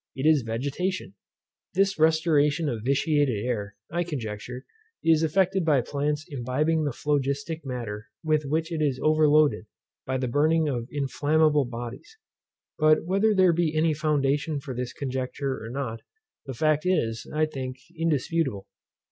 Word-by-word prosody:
It 135 +1 -3
is 155 -3 +5
vegetation. 135 - -3 0.6
This 195 -1 +2
restoration 155 -1 +3
of 115 -6 -2
vitiated 140 -4 +1
air, 105 -4 -3 0.2
I 175 +2 0
conjecture, 125 -5 -6 0.4
is 160 -1 +4
effected 185 +3 +2
by 150 -5 +3
plants 145 +4 -2
imbibing 150 +5 0
the 145 - 0
phlogistic 145 +4 -1
matter 115 -5 -5 0.2
with 155 -1 +2
which 160 +4 -1
it 160 -2 -2
is 140 -4 +1
overloaded 150 -7 +3 0.4
by 130 0 0
the 130 0 -1
burning 155 +5 +2
of 120 -5 -2
inflammable 150 +1 +2
bodies. 120 - -8 0.6
But 155 0 +4
whether 200 +4 +2
there 185 -2 +5
be 160 -2 0
any 160 0 +3
foundation 145 0 0
for 135 -2 -7
this 125 0 -4
conjecture 130 0 -3
or 115 - -6
not, 120 -3 -4 0.5
the 135 - -5
fact 155 +3 +2
is, 115 -12 0
I 155 +1 +2
think, 130 -4 -5 0.2
indisputable. 160 - -1
145 Hz, 145 wpm, -26 LUFS, 130-160 Hz, 0.6 s, is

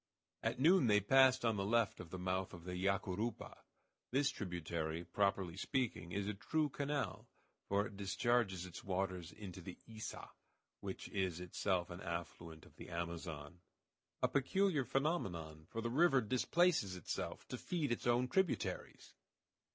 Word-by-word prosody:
At - - -1
noon 160 -1 +6
they 105 -1 +6
passed 130 +4 +5
on 115 -2 +2
the 100 - 0
left 115 +2 +2
the 95 - -5
mouth 95 0 -1
of 85 - -11
the 90 +1 -5
Yacurupa. 100 +4 -1 0.5
This 135 +2 +2
tributary, 85 - -3
properly 95 -1 +1
speaking, 105 -4 -1
is 100 +2 -1
a 105 - 0
true 150 +9 0
canal, 140 - -2 0.4
for 100 +1 +3
it 100 - -8
discharges 100 -1 +1
its 90 -3 -9
waters 95 -3 -2
into 95 -4 -8
the 90 +1 -8
Iça, 110 -1 -6 0.5
which - - -5
is 95 -4 -1
itself 90 0 -1
an 85 +2 -7
affluent 85 -1 -5
of - - -19
the - - -9
Amazon. 85 -2 -5 0.6
A - - +6
peculiar 150 +1 +2
phenomenon, 90 - -1
for 115 - -3
the 115 +1 -2
river 145 0 +5
displaces 130 - +2
itself 90 - -4
to - - -3
feed 160 -7 -1
its 120 - -1
own 120 +1 +3
tributaries! 185 +7 -1
100 Hz, 150 wpm, -38 LUFS, 90-130 Hz, 0.6 s, noon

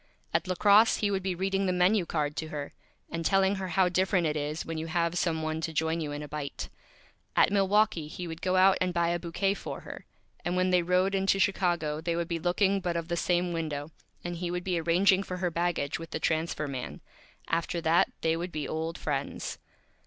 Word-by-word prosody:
At - - +1
La 185 - -1
Crosse 205 +5 +6
he 205 -1 0
would 195 -1 0
be 185 -1 -2
reading 195 +1 0
the - - +2
Menu 180 +1 +3
Card 150 -2 -1
to 160 - -3
her, 145 -2 -6 0.4
and 165 0 -3
telling 195 +2 +3
her 190 -1 -3
how 185 0 +3
different 185 0 +1
it 155 -1 0
is 150 +2 -3
when 165 -1 -4
you 160 - -4
have 170 0 0
Some 165 -3 0
One 155 0 -2
to 165 - -2
join 160 +2 0
you 150 -2 -3
in 145 +1 -5
a - - -7
Bite. 145 -1 -5 0.7
At - - +5
Milwaukee 200 -4 +2
he 175 +3 -6
would 165 0 -7
go 185 -1 +1
out 190 +1 +5
and 180 -1 0
buy 170 0 +2
a 175 0 0
Bouquet 180 +3 0
for - - -7
her, - - -10 0.4
and 175 - -1
when 185 0 +2
they 180 -1 +4
rode 180 +3 +2
into 195 0 +2
Chicago 175 -6 +1
they 170 0 -1
would 170 -1 -1
be 170 -1 -2
looking 190 +3 +2
but 175 -2 -2
of 165 0 -4
the 170 - 0
same 175 0 +1
Window, 155 -2 -3 0.3
and 175 0 -4
he 175 0 -3
would 180 0 -3
be 175 -3 0
arranging 185 +4 +4
for 185 -2 -5
her 180 -1 -1
Baggage 170 -4 -1
with 165 0 -8
the - - -3
Transfer 160 -1 -1
Man. 130 -3 -6 0.5
After 170 +1 -1
that 165 +1 +3
they 160 0 +2
would 175 +2 -4
be 150 -2 -3
Old 160 +1 -3
Friends. 140 -2 -3
175 Hz, 225 wpm, -29 LUFS, 160-185 Hz, 0.7 s, Crosse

